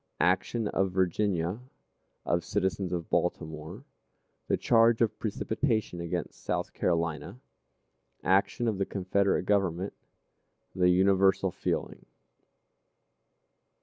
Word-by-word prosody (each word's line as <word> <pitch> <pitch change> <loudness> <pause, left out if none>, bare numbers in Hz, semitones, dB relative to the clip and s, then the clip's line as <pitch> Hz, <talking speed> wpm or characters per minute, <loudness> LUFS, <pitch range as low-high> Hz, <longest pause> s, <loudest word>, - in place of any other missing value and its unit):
Action 105 +5 +1
of 95 0 +1
Virginia. 95 0 0 0.7
Of 85 0 +1
Citizens 95 -1 -1
of 85 -2 -4
Baltimore. 80 -3 -2 0.6
The - - +2
Charge 115 -1 +4
of 110 -2 +1
Precipitation 110 -3 -1
against 85 +1 -4
South - - -2
Carolina. 85 +4 -1 0.8
Action 100 +5 +2
of 105 -4 -1
the 95 - +1
Confederate 100 0 +1
Government. 95 -2 0 0.8
The 90 -1 +3
Universal 95 +1 +3
Feeling. - - -3
95 Hz, 95 wpm, -29 LUFS, 90-105 Hz, 0.8 s, Charge